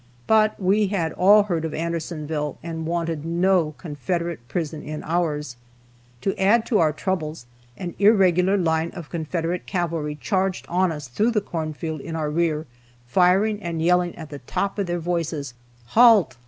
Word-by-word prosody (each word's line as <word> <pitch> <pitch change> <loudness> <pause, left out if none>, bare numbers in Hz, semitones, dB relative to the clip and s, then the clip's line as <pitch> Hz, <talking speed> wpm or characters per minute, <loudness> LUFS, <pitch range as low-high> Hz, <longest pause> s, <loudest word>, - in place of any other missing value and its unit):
But 215 -1 +3
we 200 +2 +2
had 175 -5 -1
all 205 +3 +6
heard 175 -5 -2
of 160 - -3
Andersonville, 155 -3 -3
and 160 -1 -5
wanted 165 -2 -2
no 170 -1 +1
Confederate 170 -3 -4
prison 160 -1 -3
in 155 0 -6
ours. 150 -6 -1 0.6
To 195 - -1
add 220 +4 +4
to 220 - +2
our 155 -2 +4
troubles, 155 -4 -3 0.3
an 175 -2 -5
irregular 195 -2 +4
line 160 -2 +1
of 170 -5 -9
Confederate 170 +1 -3
cavalry 165 -4 -2
charged 190 -2 -1
on 180 0 +1
us 150 -3 -6
through 210 - +1
the 230 -3 +2
corn 160 -5 -4
field 160 -1 -4
in 165 +2 -6
our 155 -2 -2
rear, 160 -1 0 0.4
firing 190 - +3
and 170 -3 -3
yelling 175 +1 +2
at 160 -2 -10
the 145 - -7
top 200 +11 -3
of 195 - -1
their 175 0 -1
voices, 165 -5 -3 0.4
"Halt! 225 - +6
170 Hz, 165 wpm, -23 LUFS, 155-190 Hz, 0.6 s, all